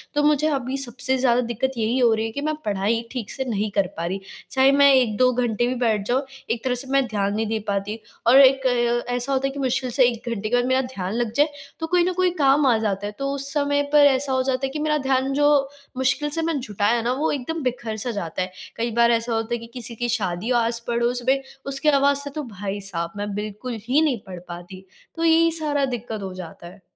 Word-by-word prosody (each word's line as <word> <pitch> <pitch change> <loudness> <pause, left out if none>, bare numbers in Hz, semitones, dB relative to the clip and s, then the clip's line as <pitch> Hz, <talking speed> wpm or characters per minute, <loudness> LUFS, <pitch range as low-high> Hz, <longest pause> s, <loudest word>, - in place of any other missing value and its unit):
तो 295 - +3
मुझे 300 0 +3
अभी 265 -1 -2
सबसे 260 0 -2
ज़्यादा 250 -1 +3
दिक्कत 240 +2 -2
यही 230 +2 0
हो 240 -3 +5
रही 220 0 -1
है 225 - -4
कि 285 - -4
मैं 310 +1 -1
पढ़ाई 210 +3 0
ठीक 245 -5 -5
से 265 - -3
नहीं 215 -3 -1
कर 200 -2 +1
पा 165 - -2
रही, 190 +3 -2 0.3
चाहे 265 0 +5
मैं 280 0 +6
1-2 255 0 +3
घंटे 240 -1 0
भी 255 - -1
बैठ 220 -3 +2
जाऊँ 255 +2 +2 0.3
एक 230 - -2
तरह 255 -1 0
से 255 +2 -5
मैं 275 -1 +3
ध्यान 200 -3 -1
नहीं 220 +1 0
दे 220 +1 -1
पाती। 200 +2 -2 0.3
और 255 +3 +8
एक 270 0 +5
अ, 240 -1 +1
ऐसा 245 +3 -1
होता 270 0 +1
है - - -4
कि 280 - -6
मुश्किल 260 -1 0
से 260 +2 +4
1 235 0 -6
घंटे 215 -2 -3
के 245 - +2
बाद 245 0 +2
मेरा 260 +1 +2
ध्यान 200 -7 -5
लग 235 -1 -1
जाए, 290 +4 +4 0.3
तो 325 - -3
कोई 355 +1 +3
न 365 +1 0
कोई 365 0 +2
काम 275 +1 +4
आ 240 -3 +4
जाता 205 -2 -2
है - - -5
तो 275 0 -1
उस 275 0 -5
समय 285 -1 +1
पे 300 - +6
ऐसा 265 0 0
हो 260 0 +2
जाता 265 0 0
है - - -2
कि 305 - -3
मेरा 300 0 +1
ध्यान 265 0 +1
जो 290 +1 +3 0.5
मुश्किल 265 +3 +1
से 325 +3 -2
मैं 325 -3 0
जुटाया 215 0 0
ना, 240 +2 0
वो 290 +5 0
एकदम 295 +3 -3
बिखर-सा 240 -2 -3
जाता 185 -5 -4
है। 185 0 -3 0.3
कई 235 +1 -1
बार 235 0 +5
ऐसा 230 0 0
होता 225 +1 -1
है 235 - -1
कि 230 - -10
किसी 240 -2 -7
की 240 +1 -2
शादी 200 -2 -1
हो 245 - +3
आस-पड़ोस 235 +1 0
में 270 +1 +3 0.2
उसकी 275 +2 0
आवाज़ 280 -1 +3
से 285 - -5
तो 305 - -3
भाई 205 -4 -5
साहब, 170 -1 -3
मैं 205 0 -3
बिल्कुल 215 +4 -5
ही 275 +5 +3
नहीं 285 -7 +1
पढ़ 180 -2 -7
पाती। 180 +2 -9 0.3
तो 330 - -3
यही 330 0 +5
सारा 300 -3 0
दिक्कत 220 -2 -6
हो 190 -1 -5
जाता 170 -2 -9
है। 185 +3 -14
245 Hz, 250 wpm, -23 LUFS, 220-275 Hz, 0.5 s, और